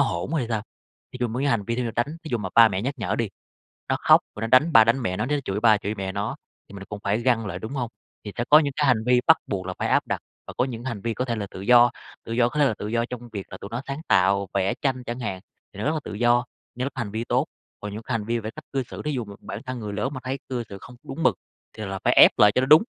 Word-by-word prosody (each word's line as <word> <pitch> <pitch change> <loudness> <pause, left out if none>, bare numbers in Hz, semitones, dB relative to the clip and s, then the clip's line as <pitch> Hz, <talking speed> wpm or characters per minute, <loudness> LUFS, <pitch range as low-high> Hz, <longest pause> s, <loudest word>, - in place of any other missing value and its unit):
hỗn 85 +8 0
thì 125 - -1
sao? 110 -3 -1 0.5
Thì - - -7
dùng 120 -2 0
mấy 130 +4 -1
cái 140 - +2
hành 110 -6 +1
vi 115 +3 -2
để 125 - 0
mà 115 - -2
đánh. 120 - +2 0.2
Thí - - -6
dụ 120 - 0
mà 100 -3 -4
ba 115 -1 +8
mẹ 95 -2 -2
nhắc 135 +4 -2
nhở 110 - -1
đi, 115 -2 -1 0.6
nó - - +2
khóc - - +6
rồi 105 - -7
nó 115 - -1
đánh 130 +8 +5
ba 115 - +9
đánh 115 +4 +2
mẹ 90 -4 -1
nó, 110 - 0
nó 145 +3 0
chửi 95 +1 -2
ba 110 -1 +5
chửi 105 +1 -4
mẹ 95 -1 -3
nó, 100 +1 -3 0.3
thì - - -13
mình 100 - -8
là - - -8
cũng 105 -1 -6
phải 100 +3 +1
găng 115 -3 +2
lại, 100 - -4
đúng 110 - -6
hông? 125 -4 -2 0.4
Thì 105 - -5
sẽ 120 - 0
có 150 - +9
những 145 -3 -1
cái 150 - +2
hành 110 -4 +3
vi 125 0 +4
bắt 160 - +8
buộc 95 -3 -3
là 95 - -3
phải - - 0
áp - - +2
đặt - - -1 0.3
và - - -7
có 125 - +3
những 120 -3 -6
hành 120 -6 -4
vi 115 +2 -2
có 125 - -2
thể 120 -2 -1
là 105 -2 -4
tự 95 - -8
do, 120 +3 +6 0.3
tự - - -7
do 120 +1 +3
có 150 - -4
thể 145 - +5
là 120 - 0
tự 105 - -5
do 115 +1 0
trong 120 -1 -8
việc 100 -2 -5
là 95 - -7
tụi 100 - -7
nó 120 +2 -3
sáng 140 +2 -4
tạo, 100 +1 +3
vẽ 100 0 +1
tranh 130 -2 0
chẳng 120 +2 -4
hạn, 100 -6 -3 0.3
thì - - -13
nó - - -2
rất 150 - +2
là 155 - -1
tự - - -7
do 120 +3 +3 0.3
như 125 - -3
lúc 135 0 -3
hành 115 -6 -3
vi 110 +1 -2
tốt. 125 +4 +1 0.3
Còn 105 -1 -6
những 110 - -6
cái 130 - -7
hành 110 -2 -1
vi 115 +1 0
về - - -11
cái 110 - -4
cách - - -9
cư 135 -1 0
xử, - - -9
thí 150 - -1
dụ 125 -4 -2
mà 100 -1 -10
bản 100 - -7
thân 130 -1 -4
người 105 -2 -5
lớn 105 +6 -1
mà 130 - -5
thấy 130 +2 -3
cư 125 -2 -2
xử 100 - -7
không 125 - -12
có 120 - -26
đúng 160 +4 -4
mực, - - +4 0.4
thì 110 - -4
là 95 0 -4
phải - - +4
ép - - +9
lại 105 -1 +7
cho 125 - +4
nó - - +1
đúng. 155 +5 +8
115 Hz, 340 wpm, -24 LUFS, 105-125 Hz, 0.6 s, ba